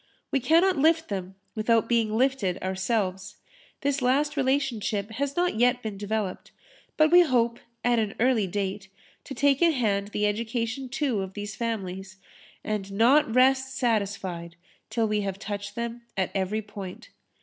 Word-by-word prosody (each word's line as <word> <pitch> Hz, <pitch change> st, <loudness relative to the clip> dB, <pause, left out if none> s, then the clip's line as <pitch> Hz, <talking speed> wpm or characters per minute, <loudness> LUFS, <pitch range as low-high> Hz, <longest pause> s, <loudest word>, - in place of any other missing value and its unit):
We 275 Hz, -, +2 dB
cannot 330 Hz, +6 st, +3 dB
lift 325 Hz, +2 st, +3 dB
them 190 Hz, -2 st, -4 dB, 0.2 s
without 225 Hz, 0 st, +2 dB
being 225 Hz, -2 st, +1 dB
lifted 245 Hz, -8 st, +1 dB
ourselves. 190 Hz, 0 st, -2 dB, 0.5 s
This 280 Hz, -1 st, 0 dB
last 280 Hz, +5 st, +2 dB
relationship 250 Hz, -7 st, 0 dB
has 280 Hz, +5 st, -2 dB
not 355 Hz, -7 st, +1 dB
yet 245 Hz, +1 st, +3 dB
been 215 Hz, -2 st, -4 dB
developed, 205 Hz, -1 st, -3 dB, 0.5 s
but 310 Hz, 0 st, +4 dB
we 355 Hz, +1 st, +9 dB
hope, 240 Hz, -7 st, +2 dB, 0.2 s
at 240 Hz, -1 st, +3 dB
an 215 Hz, -2 st, -2 dB
early 235 Hz, -4 st, +3 dB
date, 195 Hz, +1 st, -3 dB, 0.4 s
to 270 Hz, -, -7 dB
take 280 Hz, 0 st, +3 dB
in 335 Hz, -1 st, +5 dB
hand 205 Hz, -6 st, 0 dB
the 210 Hz, 0 st, -1 dB
education 230 Hz, +4 st, -2 dB
too 260 Hz, -5 st, -1 dB
of 190 Hz, 0 st, -6 dB
these 205 Hz, -1 st, -5 dB
families 190 Hz, -4 st, -4 dB, 0.5 s
and 210 Hz, -2 st, -3 dB
not 235 Hz, +6 st, +4 dB
rest 265 Hz, +1 st, +3 dB
satisfied 195 Hz, -7 st, -1 dB, 0.3 s
till 225 Hz, -2 st, 0 dB
we 210 Hz, 0 st, 0 dB
have 195 Hz, -1 st, -3 dB
touched 205 Hz, 0 st, -6 dB
them 235 Hz, 0 st, -4 dB, 0.2 s
at 190 Hz, -2 st, 0 dB
every 200 Hz, +3 st, -1 dB
point. 200 Hz, -3 st, -9 dB
225 Hz, 155 wpm, -26 LUFS, 200-265 Hz, 0.5 s, we